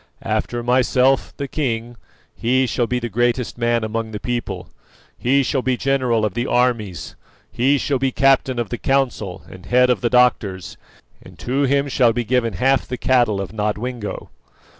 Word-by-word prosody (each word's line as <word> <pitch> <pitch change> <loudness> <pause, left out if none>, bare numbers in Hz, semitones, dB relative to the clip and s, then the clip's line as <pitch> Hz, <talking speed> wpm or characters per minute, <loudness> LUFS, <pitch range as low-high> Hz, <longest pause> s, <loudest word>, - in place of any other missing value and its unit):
After 120 0 -2
myself, 130 +2 +2
the 140 - -4
king, 120 -5 -3 0.4
he 130 +3 +1
shall 120 0 -1
be 125 - -1
the 120 -1 -3
greatest 120 +2 0
man 120 -1 0
among 110 +1 -3
the 105 -1 -6
people; 120 0 -4 0.5
he 135 +3 +2
shall 135 0 0
be 125 0 0
general 125 -5 +1
of 105 - -2
the 120 +2 -2
armies; 110 - -1 0.4
he 135 +4 +2
shall 135 -1 -1
be 135 0 0
captain 135 -1 +2
of 120 -2 -2
the 120 - -4
council 125 -9 -1
and 95 0 -13
head 125 +1 +4
of 125 - 0
the 120 - +1
doctors, 110 -7 +1 0.5
and - - -15
to 135 +3 0
him 140 +1 +1
shall 125 -4 +3
be 120 +1 -1
given 115 -1 0
half 135 +8 +1
the 125 - -4
cattle 120 -6 +2
of 100 +1 -5
Nodwengo. 105 +1 -4
120 Hz, 175 wpm, -20 LUFS, 115-130 Hz, 0.5 s, head